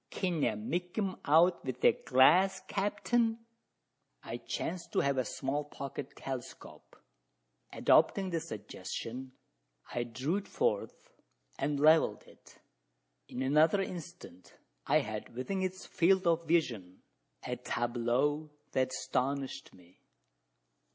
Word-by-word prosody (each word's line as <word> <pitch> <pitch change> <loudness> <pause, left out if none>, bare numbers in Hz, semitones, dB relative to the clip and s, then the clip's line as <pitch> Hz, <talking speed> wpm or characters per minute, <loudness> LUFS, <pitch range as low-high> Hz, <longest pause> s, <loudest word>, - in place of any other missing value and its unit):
"Kin 175 -5 -1
ye 110 - +2
make 175 - -4
'em 195 -3 0
out 170 +4 +4
wi' 130 -2 -3
your - - +8
glass, 185 +9 +4
capt'n?" 205 +4 0 0.9
I - - -5
chanced 170 0 -4
to - - +3
have 140 -1 +1
a - - +2
small 135 +5 -2
pocket 140 -1 -7
telescope. 130 -3 -8 0.8
Adopting 190 -2 +3
the 165 - 0
suggestion, 120 +2 -6 0.6
I 120 - -1
drew 130 - -2
it 205 - -6
forth, 480 +1 -2 0.5
and 140 +1 0
levelled 155 +2 +4
it. - - -19 0.7
In 130 - -4
another 155 +7 +4
instant, 175 - -7 0.3
I - - +4
had 110 +1 -6
within 190 +10 -2
its 185 0 -3
field 190 +2 +3
of 165 -1 +2
vision 115 - 0 0.4
a - - -3
tableau 125 +6 0 0.2
that 130 0 +1
astonished 135 +1 -2
me. 90 -1 -20
145 Hz, 120 wpm, -32 LUFS, 130-180 Hz, 0.9 s, your